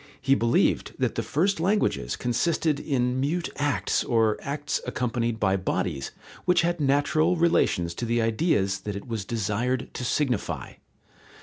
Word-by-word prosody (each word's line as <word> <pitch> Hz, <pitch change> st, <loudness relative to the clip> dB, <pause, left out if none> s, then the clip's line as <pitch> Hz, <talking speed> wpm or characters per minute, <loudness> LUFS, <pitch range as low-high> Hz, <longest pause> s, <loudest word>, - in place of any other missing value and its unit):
He 135 Hz, -, +2 dB
believed 115 Hz, -3 st, +2 dB
that -, -, 0 dB
the -, -, -1 dB
first 185 Hz, +5 st, 0 dB
languages 175 Hz, -, +1 dB
consisted 155 Hz, +4 st, 0 dB
in 125 Hz, -3 st, 0 dB
mute 160 Hz, +6 st, -1 dB
acts 145 Hz, 0 st, 0 dB
or 115 Hz, -3 st, +2 dB
acts 145 Hz, +1 st, -3 dB
accompanied 120 Hz, -2 st, -1 dB
by 95 Hz, -3 st, +2 dB
bodies 80 Hz, -6 st, -2 dB, 0.4 s
which 180 Hz, -2 st, +4 dB
had 170 Hz, 0 st, 0 dB
natural 145 Hz, +4 st, +2 dB
relations 125 Hz, -, +2 dB
to 120 Hz, -, -4 dB
the 120 Hz, +1 st, +1 dB
ideas 110 Hz, -, +1 dB
that 100 Hz, +1 st, -5 dB
it 100 Hz, -, -7 dB
was 110 Hz, -4 st, -3 dB
desired 115 Hz, +4 st, -1 dB
to -, -, -5 dB
signify. 125 Hz, -2 st, -1 dB
125 Hz, 145 wpm, -26 LUFS, 110-155 Hz, 0.4 s, which